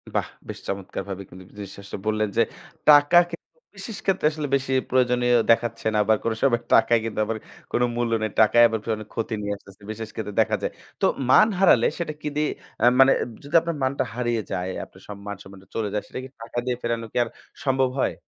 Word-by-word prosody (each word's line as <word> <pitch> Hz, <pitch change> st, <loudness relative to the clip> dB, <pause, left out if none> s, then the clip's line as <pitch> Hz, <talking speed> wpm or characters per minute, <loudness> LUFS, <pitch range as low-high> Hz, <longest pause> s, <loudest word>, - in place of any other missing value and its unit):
বাহ! -, -, +1 dB, 0.2 s
বেশ -, -, -6 dB
চমৎকারভাবে 100 Hz, 0 st, -5 dB
কিন্তু 95 Hz, +1 st, -12 dB
জিনিসটা 100 Hz, -1 st, -8 dB
আসলে 100 Hz, -, -7 dB
বললেন 110 Hz, 0 st, +1 dB
যে, -, -, +6 dB, 0.5 s
টাকা 145 Hz, +3 st, +7 dB
কিন্তু 170 Hz, -, -9 dB, 0.3 s
বিশেষ 225 Hz, -, -6 dB
ক্ষেত্রে 190 Hz, -5 st, +2 dB
আসলে 150 Hz, -1 st, -4 dB
বেশি 135 Hz, 0 st, -1 dB, 0.2 s
প্রয়োজনীয় 125 Hz, -1 st, +3 dB, 0.2 s
দেখাচ্ছে 115 Hz, -1 st, +1 dB
না। -, -, +3 dB
বা -, -, +7 dB
কোনো 115 Hz, -1 st, 0 dB
সময় 120 Hz, -4 st, +3 dB
টাকায় 115 Hz, +1 st, +5 dB
কিন্তু 110 Hz, -1 st, -4 dB
আবার 110 Hz, 0 st, -2 dB, 0.3 s
কোন -, -, +1 dB
মূল্য 120 Hz, -1 st, -1 dB
নেই। 110 Hz, -1 st, -1 dB
টাকায় 120 Hz, +2 st, +6 dB
আবার 110 Hz, -1 st, -2 dB, 0.2 s
অনেক 110 Hz, -, -9 dB
ক্ষতি 115 Hz, 0 st, -2 dB
নিয়ে 105 Hz, 0 st, -2 dB
আসছে। 100 Hz, 0 st, -17 dB
বিশেষ 110 Hz, 0 st, -6 dB
ক্ষেত্রে 105 Hz, -2 st, -5 dB
দেখা -, -, +1 dB
যায়। -, -, -2 dB, 0.3 s
তো -, -, +4 dB, 0.2 s
মান 215 Hz, -, +7 dB
হারালে, 150 Hz, -11 st, +5 dB
সেটা 165 Hz, -3 st, -3 dB
কি -, -, -4 dB
দিয়ে 150 Hz, 0 st, +1 dB, 0.3 s
আ -, -, +6 dB
মানে 135 Hz, 0 st, +8 dB
এব -, -, -6 dB
যদি 145 Hz, +4 st, -5 dB
আপনার 170 Hz, -1 st, -3 dB
মানটা 130 Hz, 0 st, +1 dB
হারিয়ে 120 Hz, -2 st, 0 dB
যায়, 90 Hz, 0 st, -2 dB, 0.2 s
আপনার 95 Hz, -, -19 dB
সব 105 Hz, -, -7 dB
মান-সম্মানটা 95 Hz, -1 st, -9 dB
চলে 110 Hz, -2 st, -1 dB
যায়, 105 Hz, -, -1 dB
সেটা -, -, -6 dB
কি 130 Hz, -, -9 dB
টাকা 115 Hz, +1 st, -8 dB
দিয়ে 125 Hz, -1 st, 0 dB
ফেরানো 115 Hz, -1 st, -2 dB
কি -, -, -4 dB
আর 115 Hz, -, -7 dB, 0.4 s
সম্ভব 135 Hz, -1 st, +2 dB
হয়? -, -, +1 dB
115 Hz, 210 wpm, -24 LUFS, 105-130 Hz, 0.5 s, মানে